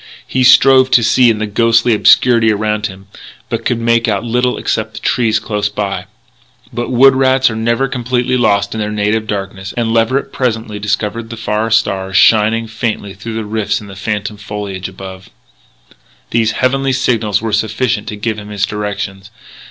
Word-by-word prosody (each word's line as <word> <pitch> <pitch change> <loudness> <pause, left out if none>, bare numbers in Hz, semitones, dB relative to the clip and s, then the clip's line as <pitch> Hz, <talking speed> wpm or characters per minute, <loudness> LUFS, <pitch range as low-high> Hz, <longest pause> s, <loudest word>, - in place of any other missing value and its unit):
He 130 - -1
strove 130 +1 +6
to 120 - +5
see 120 +2 +4
in 110 - +1
the 110 - -2
ghostly 115 +2 +2
obscurity 115 +1 +4
around 105 0 -1
him, 95 0 -12 0.4
but 115 -1 -3
could 120 - 0
make 115 0 +1
out 100 -2 0
little 125 +1 0
except 110 -1 -2
the - - -6
trees 115 -3 +1
close 105 -2 -2
by. 105 -1 -4 0.7
But 120 +1 -3
wood 130 +2 +5
rats 130 -1 +3
are - - -5
never 115 +4 0
completely 125 0 -1
lost 100 -4 +1
in 110 - -4
their 105 0 -2
native 105 +1 -1
darkness; 95 -1 -5
and 115 -1 0
Leverett 115 +4 0
presently 110 -4 -2
discovered 105 +2 -2
the 115 - -7
far 110 0 -2
stars 95 -4 0
shining 110 +2 +4
faintly 110 -2 -4
through 110 +3 -5
rifts 105 0 -2
in 105 - -11
the 100 -1 -11
phantom 105 +1 -4
foliage 100 -2 -6
above. 95 0 -10 1.0
These 115 -1 +1
heavenly 135 +1 0
signals 115 -5 0
were 110 -1 -4
sufficient 110 +1 -1
to 105 - -5
give 105 +1 -3
him 105 0 -10
his 105 0 -1
directions. 100 -2 -5
110 Hz, 175 wpm, -15 LUFS, 105-120 Hz, 1.0 s, strove